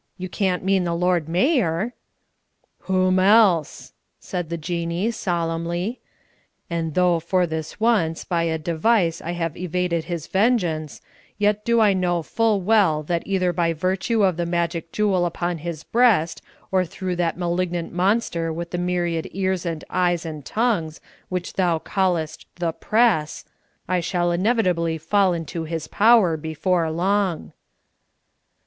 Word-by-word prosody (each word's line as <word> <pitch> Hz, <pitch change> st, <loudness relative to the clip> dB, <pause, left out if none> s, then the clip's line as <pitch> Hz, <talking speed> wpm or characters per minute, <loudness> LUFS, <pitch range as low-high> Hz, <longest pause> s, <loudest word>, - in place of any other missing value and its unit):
You 185 Hz, -1 st, -6 dB
can't 185 Hz, -2 st, -1 dB
mean 190 Hz, -1 st, +2 dB
the 170 Hz, -1 st, -1 dB
Lord 175 Hz, -2 st, +1 dB
Mayor?" 195 Hz, -, +1 dB, 0.9 s
"Whom 185 Hz, 0 st, +2 dB
else?" 190 Hz, -5 st, +3 dB, 0.3 s
said 175 Hz, -3 st, -5 dB
the 170 Hz, -, -3 dB
Jinnee, 170 Hz, +5 st, -2 dB
solemnly. 175 Hz, +1 st, -2 dB, 0.7 s
"And 165 Hz, -2 st, -2 dB
though, 180 Hz, -2 st, +3 dB
for 180 Hz, +2 st, +1 dB
this 160 Hz, +2 st, -5 dB
once, 210 Hz, -8 st, +1 dB
by 170 Hz, -1 st, -1 dB
a 160 Hz, -1 st, 0 dB
device 170 Hz, +3 st, +1 dB
I 170 Hz, -, -4 dB
have 165 Hz, -3 st, -3 dB
evaded 180 Hz, -2 st, -2 dB
his 170 Hz, -3 st, -4 dB
vengeance, 180 Hz, -, 0 dB, 0.3 s
yet 210 Hz, 0 st, +1 dB
do 235 Hz, 0 st, +3 dB
I 210 Hz, -2 st, +5 dB
know 175 Hz, -2 st, 0 dB
full 220 Hz, +3 st, +1 dB
well 185 Hz, -7 st, +3 dB
that 170 Hz, +2 st, -1 dB
either 185 Hz, -2 st, +1 dB
by 165 Hz, 0 st, +1 dB
virtue 190 Hz, +7 st, 0 dB
of 185 Hz, -4 st, +2 dB
the 175 Hz, -, -1 dB
magic 170 Hz, -1 st, -2 dB
jewel 200 Hz, -4 st, +1 dB
upon 175 Hz, 0 st, -2 dB
his 165 Hz, -1 st, -6 dB
breast, 220 Hz, -9 st, +2 dB, 0.3 s
or 190 Hz, -1 st, +3 dB
through 180 Hz, +1 st, -4 dB
that 170 Hz, -1 st, 0 dB
malignant 175 Hz, -1 st, -2 dB
monster 180 Hz, -3 st, 0 dB
with 170 Hz, +1 st, -5 dB
the 175 Hz, -, -2 dB
myriad 175 Hz, -2 st, -1 dB
ears 190 Hz, -2 st, -1 dB
and 165 Hz, -2 st, -4 dB
eyes 175 Hz, -2 st, +1 dB
and 155 Hz, -3 st, -6 dB
tongues, 200 Hz, -, -1 dB, 0.3 s
which 180 Hz, -1 st, -4 dB
thou 175 Hz, -3 st, +1 dB
callest 165 Hz, -3 st, -1 dB
'The 170 Hz, -2 st, -2 dB
Press,' 210 Hz, -10 st, +1 dB, 0.4 s
I 180 Hz, 0 st, +1 dB
shall 175 Hz, 0 st, 0 dB
inevitably 180 Hz, -4 st, +1 dB
fall 190 Hz, +4 st, +2 dB
into 165 Hz, 0 st, -4 dB
his 160 Hz, -1 st, -4 dB
power 210 Hz, -7 st, +4 dB
before 160 Hz, +2 st, -1 dB
long." 185 Hz, +2 st, -1 dB
175 Hz, 145 wpm, -23 LUFS, 165-190 Hz, 0.9 s, I